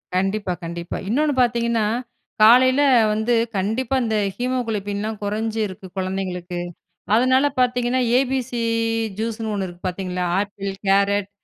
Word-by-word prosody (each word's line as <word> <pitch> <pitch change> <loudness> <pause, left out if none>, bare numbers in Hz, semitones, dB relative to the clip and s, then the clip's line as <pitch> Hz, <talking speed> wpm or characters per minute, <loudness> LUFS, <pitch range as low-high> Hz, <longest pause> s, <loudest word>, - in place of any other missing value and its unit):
கண்டிப்பா 195 0 0
கண்டிப்பா. 170 0 -5
இன்னொன்னு 295 +5 +2
பாத்தீங்கன்னா 235 -2 +1 0.6
காலையில 255 +5 +6 0.3
வந்து, 220 +3 0 0.2
கண்டிப்பா 225 +7 -1
இந்த 220 -1 -1 0.2
ஹீமோகுளோபின் 225 -5 -2
லாம் 220 -1 -4
கொறைஞ்சு 220 +2 -2
இருக்கு 185 0 -10
குழந்தைங்களுக்கு. 185 -2 -3 0.6
அதனால 260 +3 +4
பாத்தீங்கன்னா 250 0 +1 0.2
ABC 260 -1 -1 0.7
ஜூஸ்னு 225 -1 -3
1 195 -2 -2
இருக்கு 175 +1 -7
பாத்தீங்களா! 180 0 -3
Apple, 200 -1 -4 0.2
carrot, 200 0 +2
215 Hz, 115 wpm, -22 LUFS, 195-245 Hz, 0.7 s, காலையில